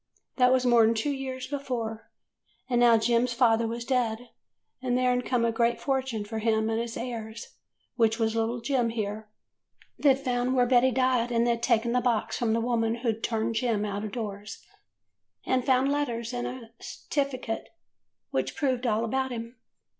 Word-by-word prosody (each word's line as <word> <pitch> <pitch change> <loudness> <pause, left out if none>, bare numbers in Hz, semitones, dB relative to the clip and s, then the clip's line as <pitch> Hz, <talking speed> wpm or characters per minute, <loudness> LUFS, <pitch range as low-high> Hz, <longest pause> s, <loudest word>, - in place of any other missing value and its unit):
That 250 -1 +5
was 255 -1 +3
more 240 -2 +6
'n 225 +1 +3
two 255 +7 0
years 260 -2 -4
before. 250 -5 -4 0.6
And 245 -2 +1
now 235 -1 +6
Jem's 235 +2 +2
father 230 -2 +3
was 235 +1 -4
dead, 245 -2 -1 0.5
and 250 -1 0
there 250 0 +2
'd 250 - -2
come 245 -2 +1
a 230 - +2
great 235 +1 +1
fortune 265 -6 -1
for 220 +1 -4
him 220 0 +1
and 225 +1 0
his 235 -1 -5
heirs, 230 -2 -6 0.4
which 225 -2 +3
was 225 -1 0
little 230 +1 -1
Jem 245 -1 +1
here. 215 -1 -4 0.7
They 275 -3 +5
'd - - -10
found 250 -1 0
where 250 -1 +4
Betty 250 +1 +4
died, 255 -1 +1
and 235 0 +2
they 235 -1 +2
'd 230 - -11
taken 235 -1 +2
the 250 +1 +2
box 235 -3 0
from 230 -2 +1
the 230 - +1
woman 230 -1 0
who 230 - +3
turned 225 +1 -2
Jem 225 -3 0
out 205 0 -3
of 215 - -5
doors, 210 -3 -6 0.8
and 255 -1 +1
found 265 +1 +3
letters 240 -5 -2
and 245 0 -2
a 245 -3 -8
'stificate 260 -5 -3 0.6
which - - -1
proved 255 -3 0
all 225 0 +1
about 265 +3 -1
him. 230 0 -6
235 Hz, 185 wpm, -27 LUFS, 225-255 Hz, 0.8 s, more